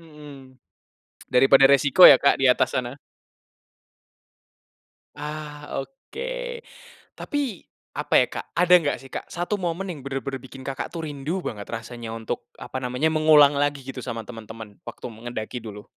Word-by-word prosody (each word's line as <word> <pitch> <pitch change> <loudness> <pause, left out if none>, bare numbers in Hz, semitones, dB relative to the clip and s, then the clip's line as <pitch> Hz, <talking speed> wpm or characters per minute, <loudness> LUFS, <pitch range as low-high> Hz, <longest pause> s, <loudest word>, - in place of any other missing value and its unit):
Mhm. 145 -5 -14 0.7
Daripada 135 +2 +5
resiko 140 +4 +4
ya 140 - +11
Kak 140 -1 +2
di 135 - +6
atas 125 - +1
sana? 125 +2 -3 2.2
Ah, 150 0 -7 0.2
oke. 485 - -7 0.5
Tapi 275 - -4 0.3
apa - - -4
ya - - +5
Kak, - - -7
ada 180 +1 +4
nggak 165 -5 +4
sih 135 - -13
Kak, - - -6
satu 175 +4 -2
momen 180 -1 -3
yang 160 -6 -6
bener-bener 135 -1 -5
bikin 130 0 -12
Kakak 135 -2 -4
tuh 165 -2 -5
rindu 150 +5 -4
banget 105 -2 -6
rasanya 115 0 -7
untuk, 115 0 -5
apa 130 - -6
namanya, 125 +4 0
mengulang 155 -2 +6
lagi 145 -1 -1
gitu 130 -1 -7
sama 115 -3 -5
temen-temen 110 -2 -10
waktu - - -10
me 110 - -15
ngendaki 120 +1 -5
dulu? 105 -2 -9
140 Hz, 150 wpm, -24 LUFS, 125-155 Hz, 2.2 s, ya